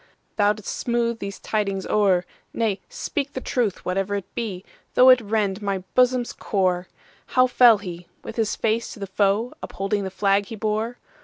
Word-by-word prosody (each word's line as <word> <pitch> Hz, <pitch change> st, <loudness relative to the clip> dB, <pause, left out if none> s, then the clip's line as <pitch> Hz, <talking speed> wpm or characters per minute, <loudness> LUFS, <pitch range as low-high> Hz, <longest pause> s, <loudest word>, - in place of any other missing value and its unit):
Thou 205 Hz, -1 st, +3 dB
'dst 210 Hz, -2 st, -13 dB
smooth 235 Hz, -1 st, -1 dB
these 200 Hz, 0 st, -6 dB
tidings 200 Hz, -3 st, -2 dB
o'er,—Nay, 200 Hz, +1 st, 0 dB
speak 280 Hz, -1 st, -3 dB
the -, -, -3 dB
truth, 240 Hz, -6 st, -1 dB
whatever 195 Hz, +2 st, -1 dB
it 200 Hz, -2 st, -6 dB
be, 200 Hz, -5 st, -4 dB, 0.3 s
Though 255 Hz, +1 st, +8 dB
it 255 Hz, -1 st, +7 dB
rend 210 Hz, -2 st, -1 dB
my 195 Hz, -2 st, -2 dB
bosom's 250 Hz, -1 st, +3 dB
core."How 185 Hz, +6 st, -1 dB
fell 245 Hz, -3 st, +6 dB
he,—with 180 Hz, -3 st, -9 dB
his 220 Hz, -2 st, 0 dB
face 225 Hz, +1 st, -1 dB
to -, -, -12 dB
the 200 Hz, -, -3 dB
foe, 200 Hz, +4 st, +1 dB
Upholding 195 Hz, +2 st, -2 dB
the 190 Hz, -, -3 dB
flag 195 Hz, +1 st, +1 dB
he 225 Hz, -, -6 dB
bore? 220 Hz, +3 st, -2 dB
210 Hz, 160 wpm, -23 LUFS, 195-235 Hz, 0.3 s, Though